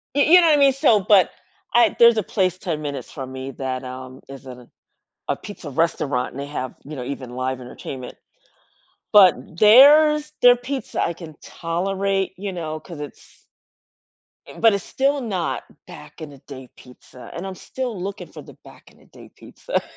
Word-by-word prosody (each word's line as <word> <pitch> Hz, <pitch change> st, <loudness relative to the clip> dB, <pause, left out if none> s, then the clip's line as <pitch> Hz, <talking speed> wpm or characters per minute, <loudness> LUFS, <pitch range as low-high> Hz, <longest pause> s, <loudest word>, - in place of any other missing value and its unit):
Y 285 Hz, -, +3 dB
you 355 Hz, +5 st, +7 dB
know 335 Hz, -, +4 dB
what 310 Hz, -, +5 dB
I -, -, +1 dB
mean? 275 Hz, -1 st, +5 dB
So 255 Hz, -6 st, +3 dB
but 190 Hz, -1 st, +4 dB, 0.4 s
I 235 Hz, -3 st, +4 dB
there's 235 Hz, -1 st, +7 dB
a 215 Hz, -, +1 dB
place 185 Hz, -1 st, -1 dB
10 165 Hz, -5 st, -4 dB
minutes 145 Hz, -2 st, -6 dB
from 130 Hz, -2 st, -8 dB
me 130 Hz, +1 st, -7 dB
that, 130 Hz, 0 st, -5 dB
um, 130 Hz, 0 st, -9 dB
is 135 Hz, 0 st, -11 dB
a 125 Hz, -2 st, -11 dB, 0.6 s
a -, -, +1 dB
pizza 200 Hz, -7 st, -10 dB
restaurant, 140 Hz, -4 st, -1 dB
they 140 Hz, +1 st, -5 dB
have, 130 Hz, -3 st, -5 dB
you 155 Hz, -, -8 dB
know, 130 Hz, -, -6 dB
even 130 Hz, -2 st, -6 dB
live 130 Hz, +1 st, -4 dB
entertainment, 125 Hz, +1 st, -9 dB, 1.0 s
but 190 Hz, -5 st, +8 dB, 0.2 s
there's 300 Hz, -, +6 dB
their 245 Hz, 0 st, +7 dB
pizza 260 Hz, +2 st, -5 dB
I -, -, 0 dB
can 165 Hz, -3 st, -12 dB
tolerate, 195 Hz, +3 st, -2 dB
you 195 Hz, +1 st, -5 dB
know, 155 Hz, -3 st, -5 dB
'cause 170 Hz, 0 st, -11 dB
it's, 145 Hz, -, -12 dB, 1.0 s
eh, -, -, -13 dB
but 225 Hz, -1 st, +5 dB
it's 200 Hz, -2 st, -2 dB
still 280 Hz, +1 st, 0 dB
not 190 Hz, -9 st, -3 dB, 0.2 s
back 75 Hz, 0 st, -13 dB
in 155 Hz, -2 st, -8 dB
the 140 Hz, -, -14 dB
day 130 Hz, -1 st, -12 dB
pizza, 125 Hz, 0 st, -15 dB
and 175 Hz, -, -6 dB
I'm 190 Hz, -1 st, -7 dB
still 245 Hz, -1 st, -6 dB
looking 200 Hz, +3 st, -6 dB
for -, -, -11 dB
the -, -, -15 dB
back -, -, -17 dB
in -, -, -25 dB
the -, -, -23 dB
day -, -, -16 dB
pizza, -, -, -5 dB
175 Hz, 185 wpm, -21 LUFS, 135-220 Hz, 1.0 s, but